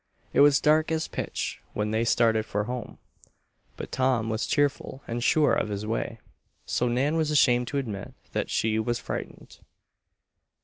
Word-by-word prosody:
It - - +2
was 145 -1 +6
dark 155 +1 +3
as 160 0 0
pitch - - -4
when 105 0 -1
they 110 +1 +1
started 115 -2 +3
for 105 +1 -1
home, 125 +1 -6 0.8
but - - -7
Tom 130 -4 +1
was 110 +1 -1
cheerful 140 -2 0
and 120 +1 -3
sure 150 +2 +4
of - - 0
his 100 0 -4
way, 115 +1 -2 0.5
so 125 - 0
Nan 135 +6 +1
was 160 -2 +1
ashamed 125 -5 +3
to 140 - -3
admit 110 -8 -5 0.2
that - - -2
she 110 0 +1
was 120 +2 0
frightened. - - -7
120 Hz, 165 wpm, -27 LUFS, 110-145 Hz, 0.8 s, was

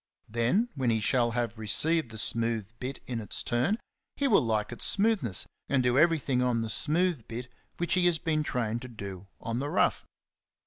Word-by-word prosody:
Then, 120 - +1
when 130 -4 0
he 110 -1 +2
shall 120 +2 +2
have 115 -2 -2
received 150 +7 +1
the 110 - -8
smooth 115 -1 -1
bit 130 +1 -5
in 120 -3 -3
its 105 - -4
turn, 125 - +1 0.4
he 280 - +1
will - - +5
like 110 -2 -1
its 120 - -7
smoothness 200 - +4 0.2
and 135 -2 +2
do 125 0 +2
everything 145 -4 +3
on 120 -2 +1
the 110 - -2
smooth 160 -1 0
bit 120 +2 -6 0.3
which 175 - 0
he 180 -1 +4
has 175 -2 +3
been 155 -1 0
trained 120 -5 -2
to 130 - -7
do 100 -5 -8
on 115 +1 -3
the 145 +2 -2
rough. - - +2
125 Hz, 190 wpm, -29 LUFS, 115-155 Hz, 0.4 s, will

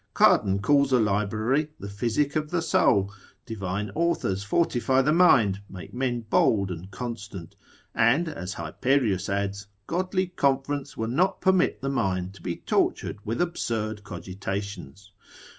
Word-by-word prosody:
Cardan 100 -1 +4
calls 140 +3 +3
a 130 - +5
library 110 +7 +1
the 100 - -7
physic 115 +9 -1
of 155 -1 -1
the 170 -1 -1
soul; 100 - +2 0.3
divine 100 -2 -4
authors 135 - 0
fortify 130 +2 +2
the 150 +3 +2
mind, 115 - +4
make 90 -4 -10
men 125 -1 -1
bold 105 -3 +2
and 90 +2 -7
constant; 105 -4 -7 0.4
and 125 +10 +3
(as 95 - -5
Hyperius 100 - 0
adds) 100 0 -2 0.2
godly 185 - -1
conference 140 -4 -1
will 110 - -2
not 175 +11 +1
permit 185 -5 +2
the 135 - 0
mind 95 -8 -1
to 95 - -15
be 85 0 -3
tortured 105 - -1
with 115 +3 -2
absurd 110 -11 -2
cogitations. 95 0 -6
110 Hz, 140 wpm, -26 LUFS, 100-140 Hz, 0.4 s, a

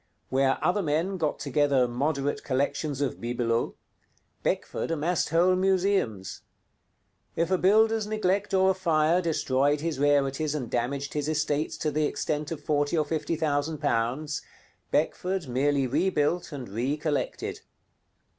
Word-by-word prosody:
Where 135 0 +2
other 180 +3 +2
men 165 +4 0
got 155 -4 -1
together 140 -2 +2
moderate 140 +3 -1
collections 145 +1 -1
of 140 - -2
bibelots, 120 -1 -1 0.7
Beckford - - -2
amassed 165 +2 0
whole 175 +3 +4
museums. 185 - 0 0.9
If 170 +2 0
a 185 - +4
builder's 220 +2 +4
neglect 205 -2 0
or 190 0 +4
a - - +1
fire 170 -2 +2
destroyed 145 -3 +1
his 160 -4 -2
rarities 145 +1 +2
and 125 -6 -4
damaged 135 +4 -2
his 150 0 -1
estates 150 -1 -1
to 155 - -1
the 150 +1 +1
extent 150 0 -2
of 155 -3 -5
forty 145 +2 +1
or 155 - +2
fifty 160 +2 -2
thousand 150 0 -1
pounds, 145 +2 -1 0.5
Beckford 185 -3 0
merely 135 +2 +1
rebuilt 165 +4 0
and 135 -5 -6
re 125 +8 -1
collected. 155 -1 -2
150 Hz, 135 wpm, -27 LUFS, 140-170 Hz, 0.9 s, whole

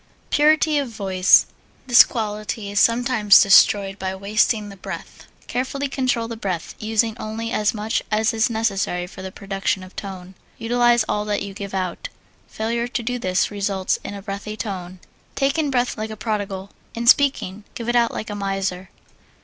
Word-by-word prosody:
Purity 305 0 +4
of 275 -3 -3
Voice 190 -4 +4 0.4
This 245 -2 +8
quality 215 -2 -4
is 205 - +1
sometimes 230 -3 +5
destroyed 195 0 +5
by 190 0 -3
wasting 210 +2 +1
the 200 - -10
breath. 190 - -9 0.2
Carefully 275 +3 -2
control 255 -4 -1
the 230 - -6
breath, 190 -6 -4
using 220 0 0
only 225 +1 -4
as 210 -1 +1
much 215 +1 -1
as 220 +2 +1
is 225 +1 +2
necessary 200 -6 -1
for 185 +1 -11
the 190 0 -6
production 195 -1 -2
of 185 - -13
tone. 190 -2 -8 0.2
Utilize 240 0 +2
all 210 - -1
that 205 -1 -1
you 200 -1 -7
give 200 0 -6
out. 185 - -3 0.4
Failure 235 +2 -2
to 245 -1 -3
do 245 +2 -2
this 185 -2 0
results 200 -2 -1
in 205 - -6
a 200 - -9
breathy 205 +1 -6
tone. 185 -4 -5 0.4
Take 275 +3 +1
in 300 -2 +1
breath 250 -2 0
like 220 0 -3
a 215 - -7
prodigal; 205 -3 -4 0.2
in 235 +1 -3
speaking, 235 -6 +3
give 235 - -6
it 240 - 0
out 235 -1 +3
like 215 - -5
a - - -4
miser. 195 -2 -3
215 Hz, 175 wpm, -22 LUFS, 195-235 Hz, 0.4 s, This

